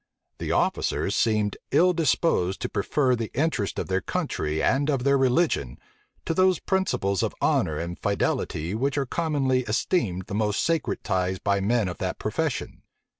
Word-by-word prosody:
The - - -3
officers 100 - 0
seemed 105 -3 +1
ill 180 +2 +4
disposed 150 - +1
to - - -2
prefer 130 +5 +1
the 115 -2 -4
interests 140 -8 0
of - - -2
their 95 0 -1
country 75 -3 -2
and 140 +2 +2
of 135 -4 0
their 140 +1 +4
religion, 130 - +1 0.5
to - - 0
those 185 +1 +3
principles 145 - 0
of - - -2
honor 75 -1 +1
and 85 +2 -5
fidelity 90 -4 -1
which 135 +6 -1
are 140 - +1
commonly 140 -3 0
esteemed 110 - -1
the - - -8
most 105 0 0
sacred 165 -3 -1
ties 95 0 0
by 100 +2 0
men 110 +1 +1
of 90 - -6
that - - -2
profession. - - -3
115 Hz, 165 wpm, -25 LUFS, 95-145 Hz, 0.5 s, ill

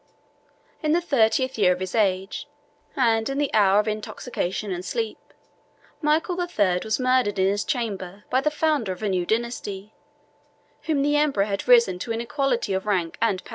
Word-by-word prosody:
In 305 0 +1
the 340 - +4
thirtieth 260 -5 +1
year 180 -3 +5
of 180 - -7
his 185 -1 -4
age, 195 -3 0 0.5
and 225 -4 +2
in 275 - -3
the 290 -1 -1
hour 200 -2 +5
of 210 - 0
intoxication 210 -2 -3
and 180 0 -4
sleep, 225 +3 -3 0.8
Michael 315 +4 +1
the 355 0 -2
Third 185 - +1
was 220 +2 -1
murdered 255 -5 +2
in 190 - +3
his 205 +1 0
chamber 205 -6 -4
by 260 - +3
the 300 - +2
founder 300 -9 0
of 185 - -11
a 210 - 0
new 180 -2 -1
dynasty, 220 -3 -3 0.9
whom 295 -3 +1
the 290 +1 +2
emperor 285 -9 +2
had 200 +1 -4
raised 235 -7 +5
to 230 - -4
an 225 - -1
equality 245 -4 -1
of 190 +2 -2
rank 180 -5 0
and 205 -5 +1
power. - - -15
220 Hz, 185 wpm, -24 LUFS, 195-265 Hz, 0.9 s, year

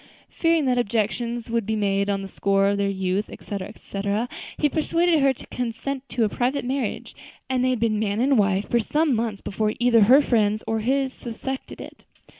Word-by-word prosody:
Fearing 330 -3 +1
that 250 -1 +2
objections 235 +1 -1
would 230 -1 +1
be 220 - 0
made 200 -1 0
on 195 -1 -1
the - - -5
score 195 0 +1
of 200 0 0
their 200 0 +1
youth, 190 +1 -1
etc., 200 -2 -6
etc., 205 +2 -3 0.3
he 300 - +3
persuaded 330 +2 +2
her 275 -1 +4
to 260 - -9
consent 255 +3 -4
to 235 - 0
a - - +3
private 250 +5 -1
marriage, 255 -3 -3 0.3
and 255 -1 0
they 255 - +3
had 255 -2 0
been 220 -2 +1
man 210 -1 -1
and 270 +3 +3
wife 195 0 +1
for 240 - +2
some 295 +6 +1
months 220 -3 -2
before 215 +1 -1
either 240 -2 +4
her 260 +6 +7
friends 215 -4 +1
or 225 0 -1
his 265 +3 0
suspected 260 +3 -6
it. - - -11
230 Hz, 200 wpm, -24 LUFS, 205-260 Hz, 0.3 s, her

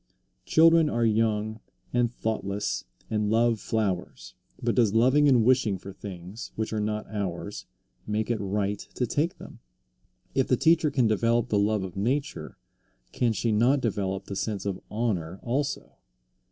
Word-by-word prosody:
Children 165 -1 +5
are 120 -2 +1
young 110 0 +1 0.3
and 120 -1 +2
thoughtless 105 -4 -2 0.3
and 105 -1 0
love 115 0 +3
flowers. 100 -5 -2 0.3
But 120 -1 0
does 115 -4 +2
loving 130 +6 +5
and 120 -5 +4
wishing 120 -6 +3
for 95 +1 -10
things 95 +2 -8
which 110 0 -3
are 110 - 0
not 105 0 -2
ours 100 -1 -4 0.4
make 105 +2 -1
it 115 - 0
right 100 0 -1 0.2
to 125 - 0
take 150 +8 -1
them? - - -12 0.7
If 135 - +1
the 125 - +3
teacher 160 +1 +4
can 135 -4 +2
develop 115 +2 +2
the 105 - +2
love 105 0 +1
of 95 -2 -7
nature, 130 +9 -2 0.5
can 120 -2 +1
she 115 +1 0
not 120 +7 +3
develop 100 -5 -2
the 100 - -6
sense 100 0 -3
of 95 -2 -3
honor 95 -6 -2
also? 140 +4 -2
110 Hz, 155 wpm, -27 LUFS, 100-120 Hz, 0.7 s, Children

